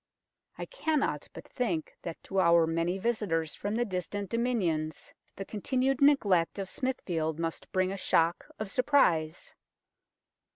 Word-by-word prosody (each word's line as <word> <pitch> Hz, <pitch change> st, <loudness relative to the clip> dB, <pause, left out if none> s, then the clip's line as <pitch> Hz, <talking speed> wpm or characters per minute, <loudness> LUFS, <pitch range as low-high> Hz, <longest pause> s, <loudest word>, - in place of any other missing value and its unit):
I -, -, -4 dB
cannot 315 Hz, -, -1 dB
but -, -, -11 dB
think 180 Hz, -, -2 dB
that 170 Hz, -2 st, -7 dB
to 195 Hz, -, -1 dB
our 170 Hz, -2 st, +5 dB
many 165 Hz, +3 st, 0 dB
visitors 195 Hz, -8 st, -1 dB
from 205 Hz, +1 st, -3 dB
the 240 Hz, +1 st, +1 dB
distant 195 Hz, 0 st, -4 dB
Dominions 185 Hz, -11 st, -1 dB, 0.2 s
the 195 Hz, -, -6 dB
continued 260 Hz, +6 st, 0 dB
neglect 205 Hz, -, +4 dB
of 195 Hz, -1 st, -4 dB
Smithfield 170 Hz, -, -2 dB
must 165 Hz, 0 st, -4 dB
bring 185 Hz, 0 st, +1 dB
a 195 Hz, -, -4 dB
shock 170 Hz, -2 st, +1 dB
of 215 Hz, -2 st, -5 dB
surprise. 175 Hz, -, +2 dB
190 Hz, 135 wpm, -30 LUFS, 165-235 Hz, 0.2 s, our